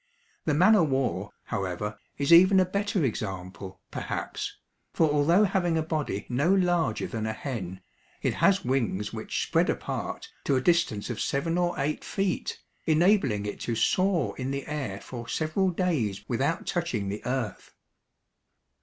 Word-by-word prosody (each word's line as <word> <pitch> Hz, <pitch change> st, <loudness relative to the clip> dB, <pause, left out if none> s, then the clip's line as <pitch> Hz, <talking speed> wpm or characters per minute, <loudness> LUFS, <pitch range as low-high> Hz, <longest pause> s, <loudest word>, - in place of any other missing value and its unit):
The 150 Hz, -, +2 dB
man 185 Hz, +8 st, +6 dB
o' 205 Hz, -, +5 dB
war, 130 Hz, -, 0 dB
however, 100 Hz, +1 st, -3 dB, 0.2 s
is 140 Hz, +4 st, +3 dB
even 185 Hz, +3 st, +8 dB
a 185 Hz, -, +4 dB
better 200 Hz, -2 st, 0 dB
example, 95 Hz, -4 st, -5 dB
perhaps, -, -, -4 dB, 0.3 s
for 160 Hz, -, +3 dB
although 150 Hz, +7 st, +4 dB
having 175 Hz, -4 st, +1 dB
a 160 Hz, -, +1 dB
body 155 Hz, -10 st, -2 dB
no 140 Hz, +8 st, +1 dB
larger 175 Hz, -, +2 dB
than 110 Hz, -1 st, -3 dB
a 110 Hz, -, -1 dB
hen, 100 Hz, -8 st, -5 dB, 0.4 s
it -, -, +1 dB
has 195 Hz, -2 st, +3 dB
wings 115 Hz, -6 st, 0 dB
which -, -, -2 dB
spread -, -, +2 dB
apart -, -, -3 dB, 0.2 s
to 140 Hz, -, +2 dB
a -, -, +3 dB
distance 145 Hz, -10 st, +1 dB
of 115 Hz, -, -4 dB
seven 165 Hz, +5 st, 0 dB
or 175 Hz, 0 st, 0 dB
eight 145 Hz, +2 st, -1 dB
feet, 195 Hz, -2 st, -2 dB, 0.3 s
enabling 155 Hz, -, +3 dB
it 105 Hz, -, -4 dB
to 115 Hz, -, -2 dB
soar 180 Hz, -, +2 dB
in 130 Hz, +1 st, -2 dB
the 140 Hz, 0 st, -3 dB
air 135 Hz, -10 st, -4 dB
for 120 Hz, +3 st, -8 dB
several 165 Hz, +5 st, +1 dB
days 145 Hz, -, -1 dB
without 140 Hz, +8 st, 0 dB
touching 145 Hz, -, -1 dB
the 105 Hz, +2 st, -5 dB
earth. 125 Hz, -5 st, -3 dB
140 Hz, 155 wpm, -27 LUFS, 110-175 Hz, 0.4 s, even